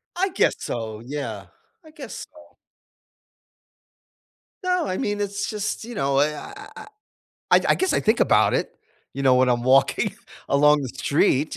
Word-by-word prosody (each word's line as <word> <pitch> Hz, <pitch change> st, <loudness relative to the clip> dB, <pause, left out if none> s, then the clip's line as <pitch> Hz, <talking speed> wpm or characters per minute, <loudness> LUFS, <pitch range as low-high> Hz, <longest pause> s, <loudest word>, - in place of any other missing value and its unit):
I 380 Hz, +3 st, 0 dB
guess 375 Hz, -, +1 dB
so. 110 Hz, -2 st, -5 dB
Yeah. 145 Hz, +2 st, -5 dB, 0.4 s
I 315 Hz, -, -15 dB
guess 290 Hz, -6 st, -8 dB
so. 305 Hz, 0 st, -19 dB, 2.1 s
No. 360 Hz, -2 st, +1 dB
I 185 Hz, -, -2 dB
mean, 205 Hz, 0 st, -2 dB
it's 200 Hz, 0 st, -3 dB
just 210 Hz, 0 st, -3 dB
you 240 Hz, +1 st, -8 dB
know, 135 Hz, -4 st, +1 dB
eh, 150 Hz, +1 st, +1 dB
I 405 Hz, +1 st, -10 dB
I -, -, -10 dB, 0.6 s
I -, -, +7 dB
I -, -, -4 dB
I -, -, +6 dB
guess 375 Hz, 0 st, 0 dB
I -, -, +1 dB
think 220 Hz, +2 st, +1 dB
about -, -, +4 dB
it, -, -, -2 dB, 0.4 s
you 140 Hz, -, -5 dB
know, 130 Hz, -1 st, +5 dB
when 130 Hz, 0 st, +3 dB
I'm 120 Hz, -1 st, +1 dB
walking 130 Hz, +2 st, +2 dB, 0.3 s
along 150 Hz, +1 st, +4 dB
the 130 Hz, -, -4 dB
street. 140 Hz, +2 st, 0 dB
150 Hz, 170 wpm, -23 LUFS, -, 2.1 s, I